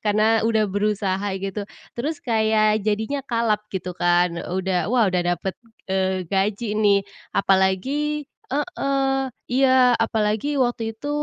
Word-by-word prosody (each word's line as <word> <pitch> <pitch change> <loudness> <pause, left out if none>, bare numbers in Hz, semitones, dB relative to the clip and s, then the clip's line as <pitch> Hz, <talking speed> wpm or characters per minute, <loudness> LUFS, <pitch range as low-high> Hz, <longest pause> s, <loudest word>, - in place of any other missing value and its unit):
karena 215 +2 +3
udah 220 -1 +2
berusaha 205 -1 -1
gitu. 195 +1 -5 0.2
Terus 295 +7 -3
kayak 220 -2 +2
jadinya 220 +7 -1
kalap 230 -3 +1
gitu 185 -2 -4
kan, 175 -1 +1
udah 185 +1 -1
wah 245 -1 +3
udah 185 -3 +1 0.2
dapet, 190 +3 -4 0.3
eee, 190 -1 -1
gaji 200 +5 -1
nih. 200 -2 +4 0.4
Apalagi 260 +12 +1 0.3
heeh, 275 -3 0 0.3
iya, 255 -2 +5
apalagi 220 +5 0
waktu 235 -2 0
itu 285 +6 -6
215 Hz, 125 wpm, -23 LUFS, 190-245 Hz, 0.4 s, iya